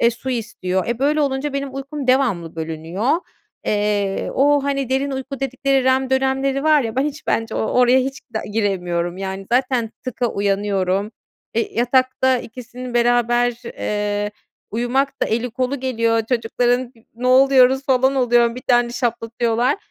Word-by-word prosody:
eee, 235 - +5
su 250 +3 -6
istiyor. 190 -6 -2
E, 235 -1 -1
böyle 295 +3 +2
olunca 275 0 -1
benim 275 -1 -4
uykum 275 0 -5
devamlı 235 -11 +1
bölünüyor. 165 - -3 0.6
Eee, 205 -2 0
o, 285 +1 +3
hani, 275 -2 -1
derin 270 +2 0
uyku 270 0 -5
dedikleri 270 0 0
REM 260 0 +2
dönemleri 270 +1 +1
var 305 -2 +5
ya, 225 0 -4
ben 265 - +2
hiç 295 0 -5
bence 225 0 -1
o - - -1
oraya 250 +3 +4
hiç 270 +1 -2 0.3
giremiyorum. 180 -5 -1
Yani 190 0 -5
zaten 250 -3 +1
"tık"a 255 -1 -1
uyanıyorum. 200 -1 0 0.4
Eee, 230 - -1
yatakta 255 +2 +2
ikisinin 245 +1 -9
beraber, 240 0 +2
eee, 205 -2 -2 0.4
uyumak 265 +5 -1
da - - +3
eli 235 +2 -1
kolu 255 +2 -2
geliyor 230 -3 +1
çocukların, 245 +1 0 0.2
ne 245 +2 -4
oluyoruz 265 0 +5
falan 265 0 +3
oluyorum, 240 -2 +3
bir 250 - -7
tane 240 -1 +2
şaplatıyorlar. 235 +1 0
245 Hz, 150 wpm, -20 LUFS, 225-265 Hz, 0.6 s, eee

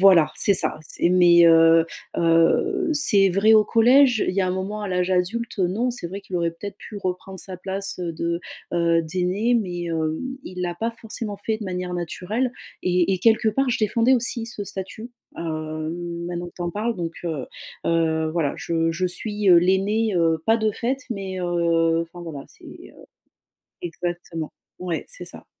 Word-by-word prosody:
voilà, 175 -6 +6
c'est 200 - +4
ça, - - 0
c'est 165 - -1
mais, 175 -1 +6
heu 165 0 +6 0.3
heu, 165 - +2
c'est 205 -10 +4
vrai 200 +4 +4
au 215 - +7
collège, 245 +2 +4
il 185 - -1
y 195 - +2
a 185 - +1
un - - 0
moment, 190 +3 -3
à 205 - -3
l'âge 180 0 0
adulte, 220 +6 -1
non, 205 +7 0
c'est 235 -8 -6
vrai 195 +3 -6
qu'il 190 -2 -10
aurait 170 -1 +1
peut-être 195 +4 -8
pu 210 - -9
reprendre 190 0 -4
sa 185 0 -7
place 195 +1 -4
de, 170 0 -2 0.3
heu, 170 -1 +2
d'aîné, 185 +8 0
mais, 180 -6 -1
hem, 160 -1 -1 0.2
il 180 0 -6
l'a 175 -1 -2
pas 225 +6 -2
forcément 225 -2 -6
fait 220 -1 0
de 220 - -6
manière 180 -1 -4
naturelle 185 +8 -2 0.3
et 180 +1 +2
et - - -3
quelque 220 0 +4
part, 265 +4 0
je - - 0
défendais 230 +4 +3
aussi 240 -1 -1
ce 220 -3 -6
statut, 200 +5 -7 0.3
heu, 155 -1 -4 0.4
maintenant 175 0 -4
que - - -18
tu 175 - -5
en 175 - -2
parles 225 +3 -2
donc, 170 -2 -3
heu 155 -6 -3 0.4
heu, 160 -1 +1
voilà. 155 -4 0
Je 165 -1 0
je 180 +3 -1
suis, 205 +3 -2
heu, 175 -2 +8
l'aînée, 195 +5 +2
heu, 165 -2 +2
pas 225 +1 +4
de 220 -1 0
fait 245 +5 -1
mais, 195 -4 -4
heu 170 -1 +2
enfin 170 +1 -11
voilà, 145 -4 -7
c'est, - - -18
heu - - -13 0.8
exactement. 175 -2 -5 0.3
Ouais, 180 -3 -3
c'est - - -8
ça. - - -9
180 Hz, 190 wpm, -23 LUFS, 170-210 Hz, 0.8 s, heu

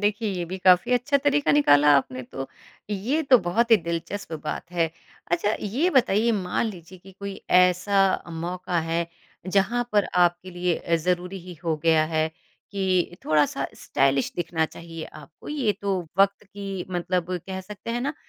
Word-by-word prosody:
देखिए 210 +1 0
ये 180 -3 -3
भी 185 +3 -6
काफ़ी 185 +5 +4
अच्छा 250 +4 +2
तरीका 290 0 +3
निकाला 150 - +5
आपने 130 -2 -2
तो। 135 +2 -7 0.4
ये 230 +11 0
तो 265 -4 +6
बहुत 225 +6 0
ही 225 - +9
दिलचस्प 170 +2 -5
बात 165 +2 -5
है। 165 -2 +1 0.4
अच्छा 175 +5 +1
ये 260 - 0
बताइए 235 - +3
मान 190 +1 -1
लीजिए 185 -3 -9
कि 190 +2 -15
कोई 200 +1 -7 0.2
ऐसा 180 +2 +3 0.3
मौका 175 +1 -3
है 170 0 0 0.4
जहाँ 200 +6 +1
पर 205 -1 +4
आपके 175 +1 +2
लिए 175 -1 0
अ, 170 - -1
ज़रूरी 180 +3 -2
ही 180 +1 -10
हो 165 -2 0
गया 160 -1 +4
है 155 0 +2 0.4
कि 185 -3 0
थोड़ा-सा 145 -2 +2
स्टाइलिश 135 -1 +1
दिखना 165 -2 0
चाहिए 165 0 -9
आपको 165 - -13
ये 275 -8 0
तो 200 -1 0 0.2
वक़्त 200 +1 +3
की 195 -2 -6
मतलब 180 0 -1 0.2
कह 190 -1 -4
सकते 210 +4 -8
है 240 +1 -1
ना 280 +4 -2
185 Hz, 165 wpm, -25 LUFS, 170-205 Hz, 0.4 s, ही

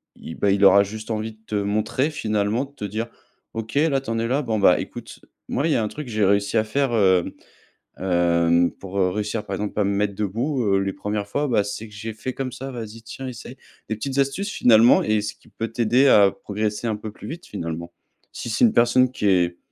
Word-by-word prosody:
il, 80 - -9
bah, 100 - +1
il 100 +1 +2
aura 100 +1 +7
juste 110 +3 -7
envie 110 0 -3
de 110 - -26
te 105 - -3
montrer 105 +7 0
finalement, 110 -3 0
de 140 - -19
te 105 - -6
dire: 110 +4 -3 0.5
«OK, 110 0 -5
là, 145 -1 +3
tu 135 - -9
en 115 0 -1
es 115 - -1
là. 135 +5 +1
Bon, 115 -6 -1
bah, 90 -3 +5
écoute, - - -8 0.3
moi, 145 - 0
il - - +1
y - - +2
a 115 - 0
un - - -1
truc 150 +3 -7
que - - -7
j'ai 105 -1 +2
réussi 100 +3 +2
à 110 - +4
faire, 135 +4 0
hem, 95 -5 +3 0.7
hem, 85 -1 +2
pour, 95 0 -8
heu, 90 -1 +3
réussir, 105 +3 -3
par 100 - -3
exemple, 105 +2 -4
à - - +4
me 100 - +1
mettre 100 0 0
debout, 120 +7 -1
heu, 100 -2 +2
les 95 0 -1
premières 105 0 -3
fois, 145 +8 -1
bah, 110 -6 +2
c'est 105 +2 -5
que - - -17
j'ai 110 +2 -6
fait 130 +4 -5
comme 130 -1 -4
ça, 135 +1 -6
vas-y, 115 -2 -7
tiens, 130 +4 -7
essaye». 125 +1 -9 0.3
Des 110 - -1
petites 135 +5 -4
astuces 140 +10 0
finalement 115 - +5
et 110 0 +2
ce 105 - -4
qui - - -23
peut 115 - -4
t'aider 120 +4 +3
à 100 -6 +6
progresser 105 +3 -3
un 110 - 0
peu 105 0 -7
plus - - -11
vite, 170 +2 -7
finalement. 85 -3 -5 0.4
Si - - -6
c'est 110 - +1
une 225 - +3
personne 120 +2 +4
qui 105 - -1
est 90 -2 +2
110 Hz, 245 wpm, -23 LUFS, 100-120 Hz, 0.7 s, aura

